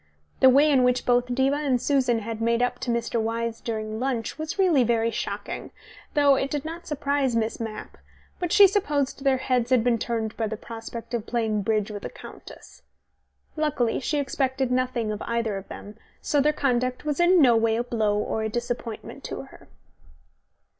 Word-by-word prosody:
The 260 - +7
way 285 +4 +5
in 265 -3 +4
which 250 0 +2
both 245 0 +2
Diva 270 +2 +2
and 275 -4 +1
Susan 250 -4 +1
had 225 +1 -5
made 235 +1 +2
up 245 0 -1
to - - -4
Mr. 235 -1 0
Wyse 230 0 -2
during 220 -1 -4
lunch 255 +1 -2
was 315 +3 -4
really 350 -9 +4
very 230 -1 +1
shocking, - - -5 0.5
though 285 -1 +5
it 270 0 0
did 295 0 -3
not 335 +2 -7
surprise 280 -3 0
Miss 225 0 -1
Mapp, 220 -2 -7 0.4
but 355 -2 -2
she 405 - +8
supposed 295 -9 0
their 270 -2 +3
heads 250 -2 0
had 255 -3 +4
been 235 -1 +2
turned 225 -2 -2
by 225 - -1
the 220 +1 -4
prospect 230 +1 -8
of 235 -2 -2
playing 220 -3 0
bridge 215 0 0
with 205 -1 -7
a - - -4
countess. - - -13 0.7
Luckily 295 -7 0
she 295 +3 -1
expected 265 -2 -1
nothing 250 -3 0
better - - -1
of - - -8
either 230 -3 -1
of 195 - -9
them, 210 +1 -10 0.2
so 290 - +1
their 300 +2 +3
conduct 255 -2 -1
was 300 0 -1
in 350 +1 +5
no 250 -6 +6
way 225 0 +2
a 235 - 0
blow 220 -4 0
or 220 +1 -1
a 220 - -1
disappointment 240 -1 -5
to - - -5
her. - - -16
245 Hz, 195 wpm, -25 LUFS, 225-275 Hz, 0.7 s, she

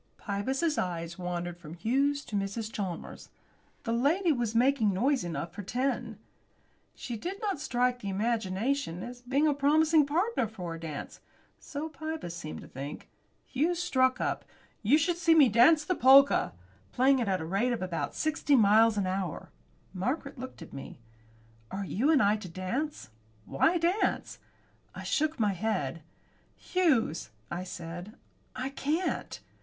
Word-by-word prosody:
Pybus's 265 +10 -1
eyes 170 0 -3
wandered 175 -1 -4
from 165 -1 -10
Hughes 275 +9 +1
to 215 - -6
Mrs. 205 +3 -3
Chalmers. 185 -5 -5 0.5
The 230 - -1
lady 320 +9 +2
was 240 -5 -1
making 240 -3 +3
noise 260 +6 +2
enough 170 0 -4
for 205 - -6
ten. 255 +7 -2 0.8
She 240 - -5
did 365 - -5
not 405 -8 -2
strike 250 -1 +1
the 200 - -5
imagination 210 0 -1
as 245 0 -8
being 270 +5 +1
a 295 - +3
promising 305 +2 +4
partner 345 - +1
for 180 -6 -6
a 165 - -7
dance. 155 -3 -7 0.4
So 300 +2 -5
Pybus 315 - -5
seemed 155 -3 -7
to - - -11
think. 140 +3 -8 0.4
Hughes 320 +6 0
struck 260 -6 +2
up, - - -1 0.4
"You 235 +8 +5
should 335 +2 +1
see 335 -2 +4
me 290 -6 +7
dance 300 +8 +5
the 365 - +1
polka," 275 -1 +6 0.4
playing 265 +2 +4
it 235 - -1
at 190 -1 +2
the 160 - -5
rate 200 +9 +1
of 235 -6 -2
about 175 -3 -3
sixty 310 -2 +1
miles 220 -1 +5
an 200 - +1
hour. 185 -3 -3 0.4
Margaret 260 - -3
looked 255 -8 -8
at - - -14
me. 135 - -8 0.7
"Are 195 +1 -4
you 240 +10 0
and 300 -8 +5
I 205 +2 +3
to 195 -4 -8
dance? 185 - -4 0.3
Why 320 - +2
dance?" 345 +5 0 0.6
I - - -7
shook 310 -2 0
my 210 -3 +2
head. 170 -7 -2 0.5
"Hughes," 255 - +1 0.2
I 175 +2 -3
said, 175 +4 -7 0.4
"I 260 +1 -3
can't." 300 +6 -2
240 Hz, 155 wpm, -29 LUFS, 185-285 Hz, 0.8 s, me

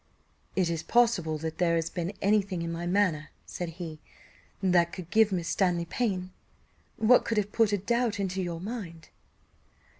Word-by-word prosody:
"Is 180 -3 +1
it 165 -1 -4
possible 210 -10 +3
that 160 +2 -5
there 170 -2 +3
has 165 0 -1
been 175 0 -3
any 210 +2 +4
thing 185 -4 -4
in 170 - -3
my 170 +1 -4
manner," 175 -5 +1 0.2
said 175 -2 -5
he, 160 -4 -6 0.6
"that 175 -3 +3
could 180 -2 -8
give 220 0 +4
Miss 175 -3 -2
Stanley 175 -3 +1
pain? 185 -2 -2 0.7
What 230 +3 +5
could 230 - -2
have 210 0 0
put 225 -2 +3
a 205 - +2
doubt 235 +2 0
into 190 -1 -1
her 165 - -5
mind?" 180 -5 -7
185 Hz, 175 wpm, -28 LUFS, 170-210 Hz, 0.7 s, What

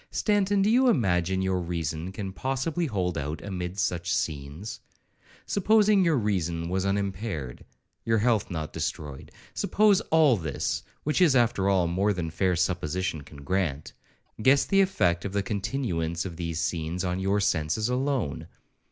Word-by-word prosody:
—Stanton, 205 -2 +1
do 205 - +3
you 255 +2 +5
imagine 95 - +1
your 95 -1 0
reason 85 0 -3
can 95 -1 -5
possibly 135 - -1
hold 90 - -1
out 75 +3 -4
amid 90 -2 -5
such 85 -3 -1
scenes?—Supposing 180 - -1
your 165 -4 +3
reason 85 -6 -1
was 95 +1 0
unimpaired, 95 - -3 0.4
your 115 0 +2
health 110 -1 +1
not 80 -4 -4
destroyed,—suppose 185 - 0
all 155 -7 +5
this, 80 -7 -2 0.2
which 150 +5 0
is, 160 -7 +5
after 115 -6 +2
all, 95 -3 +3
more 95 +5 +1
than 85 -3 -4
fair 90 +1 +1
supposition 90 -1 -1
can 70 0 -13
grant, 80 -4 -2 0.5
guess 135 +5 +5
the 195 -1 +4
effect 85 - +1
of 100 - -4
the 100 -1 0
continuance 95 -6 -2
of 90 -3 -6
these 85 -2 -3
scenes 85 +1 -2
on 90 +1 -1
your 95 +2 +1
senses 95 +1 0
alone. 130 - -1
95 Hz, 145 wpm, -27 LUFS, 85-125 Hz, 0.5 s, you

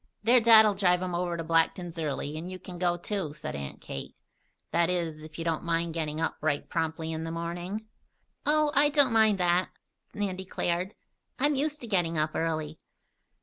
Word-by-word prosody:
"Their 240 +3 +6
dad'll 220 -2 +7
drive 185 -2 +2
'em 180 -1 -3
over 175 0 -1
to 165 - -3
Blackton's 165 +1 +1
early, 150 -1 -3
and 165 +3 -5
you 185 - -6
can 180 -1 -10
go, 175 -1 +1
too," 175 -4 -4
said 150 - -6
Aunt 70 -1 -6
Kate. 70 - -7 0.6
"That 170 0 +2
is, 165 -4 -1
if 155 0 -11
you 165 - -4
don't 165 -2 -1
mind 170 -1 0
getting 155 -2 -3
up 165 - -1
right 150 -2 0
promptly 160 0 -2
in 160 0 -3
the 165 - -4
morning?" 175 +5 -4 0.6
"Oh, 305 0 +3
I 290 +1 +5
don't 285 -5 +4
mind 220 -2 +5
that," 180 0 +2 0.5
Nan 200 -3 -2
declared. 185 0 -2 0.4
"I'm 290 +3 +2
used 295 +2 -1
to 240 - -6
getting 175 -6 +1
up 155 0 +1
early." 155 -1 -2
175 Hz, 190 wpm, -28 LUFS, 160-200 Hz, 0.6 s, dad'll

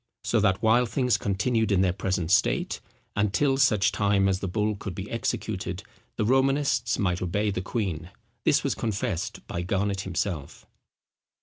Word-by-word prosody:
So 115 - +2
that 95 -1 +1
while 120 +2 +4
things 125 0 +1
continued 110 +3 0
in 95 -2 +3
their 95 -2 +2
present 90 -3 -2
state, 95 - +2 0.3
and 105 -1 +1
till 135 +4 +2
such 115 -8 +3
time 100 -1 +2
as 95 -1 +1
the 95 - -3
bull 105 +3 0
could 100 -3 -6
be 95 +3 -5
executed, 115 - -3 0.3
the 110 - 0
Romanists 135 0 +2
might 90 -3 0
obey 100 +4 0
the 95 - -2
queen. 95 -6 -3 0.3
This - - +3
was - - +1
confessed 100 -6 -3
by 85 - -4
Garnet 100 +2 -1
himself. 90 -5 -4
100 Hz, 165 wpm, -26 LUFS, 95-115 Hz, 0.3 s, while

